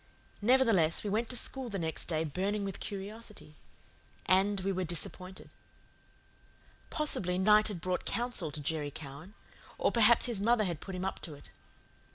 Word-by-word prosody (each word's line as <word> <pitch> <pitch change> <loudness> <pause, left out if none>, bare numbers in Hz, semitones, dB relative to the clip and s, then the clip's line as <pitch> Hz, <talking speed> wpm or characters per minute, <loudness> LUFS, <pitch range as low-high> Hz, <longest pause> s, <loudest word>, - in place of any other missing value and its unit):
Nevertheless, 220 -9 +4
we 205 - -2
went 225 +3 0
to 250 - -1
school 260 +1 -3
the 200 - -3
next 160 -3 -3
day 160 -2 +1
burning 195 +6 -1
with 195 -2 -5
curiosity. 205 -5 -7 0.7
And 195 +2 +3
we 195 +1 0
were 185 -1 -1
disappointed. 180 +2 -4 1.4
Possibly 190 - 0
night 210 +3 +5
had 200 -6 -5
brought 180 +1 -1
counsel 235 -9 -1
to 150 0 -4
Jerry 150 0 -1
Cowan; 155 +7 -10 0.4
or - - +2
perhaps 230 0 +5
his 235 -5 -1
mother 230 +1 +3
had 170 -5 -3
put 190 - -6
him 185 +1 -3
up 190 - -3
to 155 -5 -7
it. 140 - -15
195 Hz, 165 wpm, -32 LUFS, 170-215 Hz, 1.4 s, night